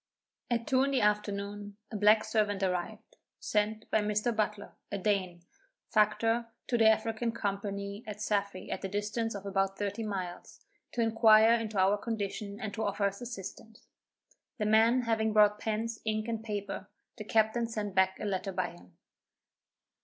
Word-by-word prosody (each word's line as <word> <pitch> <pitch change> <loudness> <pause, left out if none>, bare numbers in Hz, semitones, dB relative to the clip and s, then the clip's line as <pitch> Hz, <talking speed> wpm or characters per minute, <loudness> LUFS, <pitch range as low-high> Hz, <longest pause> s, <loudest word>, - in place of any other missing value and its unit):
At 235 -1 0
two 260 -1 +3
in 275 - +2
the 270 -2 +1
afternoon 205 -1 -1
a - - -5
black 210 +1 +5
servant 210 -3 0
arrived, 180 -2 -3 0.2
sent 215 +1 -1
by 220 - +4
Mr. 210 +3 0
Butler, 210 -1 -2 0.2
a 200 - -1
Dane, 185 -3 -1 0.5
factor 225 +2 +2 0.2
to 250 - -1
the 220 -1 +7
African 225 +1 +1
Company 200 0 -4
at 210 -1 -6
Saffy 200 -2 -2
at - - -3
the 195 - -2
distance 210 +3 -2
of 200 0 -7
about 195 0 0
thirty 205 +2 -3
miles, 190 -5 -6 0.3
to 240 - 0
inquire 225 0 +6
into 225 -3 -1
our 195 +2 +3
condition 205 -2 -4
and 215 -4 -4
to 220 - -4
offer 200 0 -1
us 200 +2 0
assistance. 220 -1 -8 0.7
The 215 - -1
man 225 +4 +4
having 220 -2 +1
brought 210 -1 +5
pens, 225 +1 -2
ink 215 0 -1
and 225 -1 -3
paper, 205 -2 -4 0.3
the 215 - -6
captain 220 +2 +2
sent 210 -3 -4
back 190 0 +2
a - - -4
letter 195 -1 -2
by 185 0 -2
him. 85 0 -18
210 Hz, 165 wpm, -31 LUFS, 200-225 Hz, 0.7 s, the